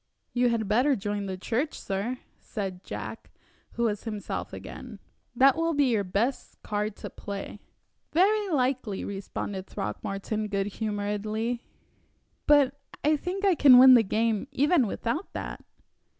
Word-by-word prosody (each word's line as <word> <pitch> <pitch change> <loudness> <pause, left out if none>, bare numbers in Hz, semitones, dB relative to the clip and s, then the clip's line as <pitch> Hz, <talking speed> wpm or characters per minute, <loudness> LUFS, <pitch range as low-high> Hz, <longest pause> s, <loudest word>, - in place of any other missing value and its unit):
"You 245 0 +3
had 225 -3 0
better 250 +7 +3
join 205 -1 -3
the 190 -1 -4
church, 245 +10 -2
sir," 200 +6 -3 0.2
said 190 -4 -5
Jack, - - -7 0.4
who 235 - -1
was 210 -2 -1
himself 215 -3 -4
again. - - -9 0.4
"That 270 +2 +6
will 330 0 0
be 280 -3 +3
your 215 -3 +2
best 210 +8 -2
card 210 0 -2
to - - -7
play." 200 0 -7 0.5
"Very 405 +4 +3
likely," 255 - 0
responded 195 -1 -5
Throckmorton, 200 +2 -3
good 200 -1 -1 0.2
humoredly, 215 +3 -2 0.9
"but 285 -2 +4 0.2
I 305 +2 +4
think 365 +6 -3
I 390 - +5
can 275 -6 +8
win 260 +1 +10
the 240 - +8
game 220 +2 0
even 290 -3 +3
without 240 - -3
that." - - -6
230 Hz, 140 wpm, -27 LUFS, 205-275 Hz, 0.9 s, win